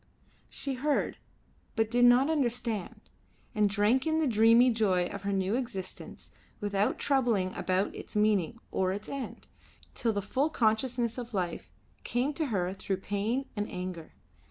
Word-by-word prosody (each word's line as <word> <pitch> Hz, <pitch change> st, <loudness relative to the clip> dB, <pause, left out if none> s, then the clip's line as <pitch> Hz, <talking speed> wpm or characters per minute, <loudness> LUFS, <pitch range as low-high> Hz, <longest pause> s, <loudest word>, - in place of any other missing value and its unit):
She 275 Hz, -, -3 dB
heard, 285 Hz, +3 st, 0 dB, 0.6 s
but 225 Hz, -1 st, +1 dB
did 245 Hz, +1 st, +5 dB
not 245 Hz, +3 st, +6 dB
understand, 240 Hz, -, -1 dB, 0.5 s
and 210 Hz, -3 st, +3 dB
drank 215 Hz, +7 st, +2 dB
in 315 Hz, 0 st, +2 dB
the 320 Hz, -, +2 dB
dreamy 230 Hz, +1 st, +5 dB
joy 195 Hz, -6 st, +2 dB
of 200 Hz, +2 st, -6 dB
her 200 Hz, +1 st, -2 dB
new 195 Hz, +1 st, 0 dB
existence 235 Hz, -7 st, -6 dB, 0.3 s
without 205 Hz, -1 st, 0 dB
troubling 235 Hz, -9 st, +1 dB
about 185 Hz, +1 st, 0 dB
its -, -, -8 dB
meaning 210 Hz, 0 st, +2 dB
or 185 Hz, -1 st, +1 dB
its 205 Hz, +2 st, -5 dB
end, 275 Hz, -2 st, -6 dB, 0.5 s
till 230 Hz, -, 0 dB
the 200 Hz, -2 st, -2 dB
full 270 Hz, +8 st, 0 dB
consciousness 235 Hz, -1 st, 0 dB
of 235 Hz, -2 st, -6 dB
life 180 Hz, -2 st, -3 dB, 0.3 s
came 250 Hz, +5 st, 0 dB
to 310 Hz, +1 st, -1 dB
her 185 Hz, -6 st, -1 dB
through 195 Hz, 0 st, -3 dB
pain 205 Hz, +7 st, -2 dB
and 205 Hz, 0 st, -2 dB
anger. 180 Hz, -3 st, -6 dB
220 Hz, 155 wpm, -30 LUFS, 200-250 Hz, 0.6 s, not